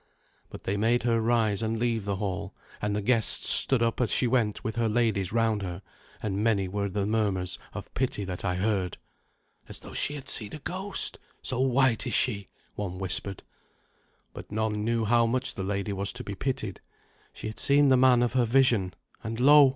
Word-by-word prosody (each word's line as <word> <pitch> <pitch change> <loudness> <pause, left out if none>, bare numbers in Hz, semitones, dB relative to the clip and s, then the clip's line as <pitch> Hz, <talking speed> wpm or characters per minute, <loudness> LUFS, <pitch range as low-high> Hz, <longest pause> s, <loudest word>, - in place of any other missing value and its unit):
But - - -11
they 100 - -2
made 115 +3 +1
her 115 -1 +1
rise 110 -3 +1
and 110 0 -2
leave 115 -3 -1
the 100 -1 -2
hall; 95 -1 -4 0.3
and 105 0 -1
the 105 - -2
guests 115 0 +5
stood 130 -3 +8
up 115 +2 -1
as 120 - +1
she - - +3
went 115 -4 0
with 110 - -4
her 115 -1 0
ladies 110 -5 0
round 115 -2 +1
her, 90 0 -6 0.4
and 100 0 -2
many 105 -4 +1
were 100 +1 -3
the 100 +1 -2
murmurs 100 -4 -1
of - - -9
pity 125 -6 -2
that 90 -1 -6
I 90 -2 -1
heard. 95 -2 -1 0.7
"As - - -6
though - - -11
she 145 - -2
had 135 -2 -9
seen 105 -3 -4
a - - -7
ghost, 190 +6 -3 0.2
so 130 - -3
white 130 -2 +2
is - - 0
she," 100 -6 0 0.3
one 90 -3 -5
whispered. 95 +1 -1 0.9
But - - -11
none 105 0 -2
knew 115 0 0
how 115 +1 +3
much 130 +3 -1
the - - -6
lady 100 +1 -3
was 100 0 -1
to 125 0 -6
be 100 - -6
pitied. 110 -4 -4 0.5
She - - -10
had 110 0 -5
seen 145 0 +4
the 130 - +5
man 125 -1 +4
of 120 - -1
her 125 -2 +2
vision; 115 -7 +2 0.3
and, 115 +1 -5
lo! 145 +1 +7
110 Hz, 200 wpm, -27 LUFS, 100-120 Hz, 0.9 s, stood